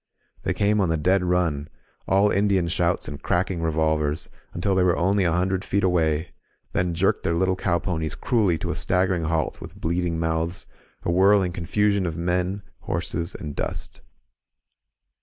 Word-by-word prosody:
They - - -1
came 105 +1 +2
on 95 - +1
the 80 - +1
dead 90 +5 +2
nm, 85 -5 0 0.4
all 100 +2 +4
Indian 100 -3 +2
shouts 85 +2 0
and 70 -1 -7
cracking 90 -1 0
re 80 -1 0
volvers, 80 -1 0 0.2
until 95 +3 0
they 95 - +3
were 90 -1 +3
only 95 +2 +2
a 85 - +2
hundred 95 +2 0
feet 100 0 0
away, 80 -3 +1 0.4
then 90 -2 0
jerked 95 +4 +2
their 85 - 0
little 95 +2 +2
cow 90 -2 +1
ponies 80 -3 -2
cruelly 105 -10 +1
to - - -3
a - - -3
staggering 90 -2 +1
halt 80 -1 -1
with - - -10
bleeding 85 0 -1
mouths, 80 +1 -1 0.4
a - - 0
whirling 95 +1 +4
confusion 100 +2 +1
of 80 - -4
men, 90 +3 -1 0.2
horses 85 +3 -3
and 75 -3 -6
dust. - - -4
90 Hz, 170 wpm, -24 LUFS, 80-95 Hz, 0.4 s, all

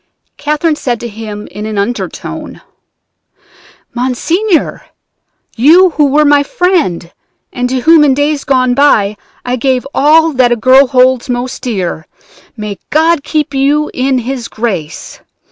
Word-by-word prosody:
Catherine 300 +2 -1
said 240 -5 -2
to 240 - -5
him 215 -1 -8
in 210 +1 -6
an 215 -1 -5
undertone: 235 +5 -5 1.3
"'Monseigneur, 325 - -1 0.7
you 340 +10 +5
who 295 -1 +2
were 300 +2 +2
my 290 0 +4
friend, 285 - -1 0.4
and 250 0 -2
to 260 0 -2
whom 320 +2 +5
in 275 -3 +3
days 290 0 -1
gone 255 -2 +1
by 220 -7 +2 0.3
I 250 +1 -1
gave 255 +1 0
all 320 +3 +3
that 255 -2 +2
a - - +3
girl 255 +4 +4
holds 255 -1 +2
most 245 +1 -4
dear, 185 -9 -4 0.5
may 210 -3 -6
God 320 0 +2
keep 300 -1 -2
you 285 +3 0
in 260 +1 0
His 250 0 -4
grace! 195 -11 -5
260 Hz, 140 wpm, -12 LUFS, 235-295 Hz, 1.3 s, you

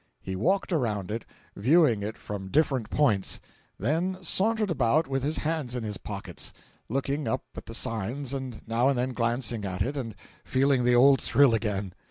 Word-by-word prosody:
He 95 - -5
walked 190 - +1
around 105 - -1
it, 115 +2 -4 0.3
viewing 125 - +4
it 105 +2 -4
from 100 -2 -6
different 135 -1 +1
points; 110 -11 +1 0.4
then 165 - 0
sauntered 210 +3 +2
about 140 +2 +2
with 135 0 -1
his 150 +4 -1
hands 155 -6 -1
in 125 - -3
his 105 -2 -3
pockets, - - -6 0.4
looking 140 +4 -1
up 130 - -1
at - - -9
the 115 - -6
signs 120 +6 -2
and 130 -4 -5
now 115 +3 +2
and 140 - +1
then 125 +1 -1
glancing 120 -1 0
at 95 -1 -1
it 140 +4 -3
and 115 -6 -4 0.3
feeling 130 -1 +2
the 125 0 +4
old 135 +2 +6
thrill 140 -4 +4
again. 100 -4 -1
125 Hz, 180 wpm, -27 LUFS, 110-145 Hz, 0.4 s, old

